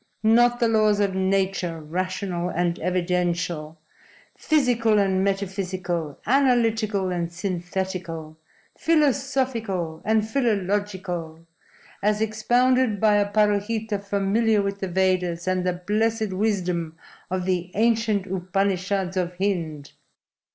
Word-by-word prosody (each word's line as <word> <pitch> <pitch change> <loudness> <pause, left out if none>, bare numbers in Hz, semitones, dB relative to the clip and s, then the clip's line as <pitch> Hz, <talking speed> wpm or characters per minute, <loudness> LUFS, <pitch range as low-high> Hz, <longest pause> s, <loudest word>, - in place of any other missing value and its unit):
Not 240 +2 +4
the 235 - +3
laws 215 -2 +3
of 200 -2 +1
nature, 190 -3 0
rational 180 +2 -3
and 175 0 -1
evidential, 175 -3 -1 0.6
physical 245 -8 +2
and 190 -2 +2
metaphysical, 185 -5 -2
analytical 225 -6 +2
and 170 -1 -2
synthetical, 175 -3 -4 0.4
philosophical, 260 - 0
and 220 0 +1
philological, 195 -8 -2 0.6
as 210 +1 +1
expounded 240 +1 +2
by 210 0 +4
a 205 0 +1
Parohita 210 +1 +1
familiar 205 +2 +1
with 200 0 -3
the 190 - -2
Vedas 180 -2 0
and 185 -1 0
the 180 - +1
blessed 215 +3 -1
wisdom 180 -5 -1 0.3
of 185 0 -2
the 180 -1 -1
ancient 220 -2 +2
Upanishads 190 0 -1
of 180 -1 -2
Hind!" 165 -7 -2
195 Hz, 105 wpm, -24 LUFS, 180-220 Hz, 0.6 s, Not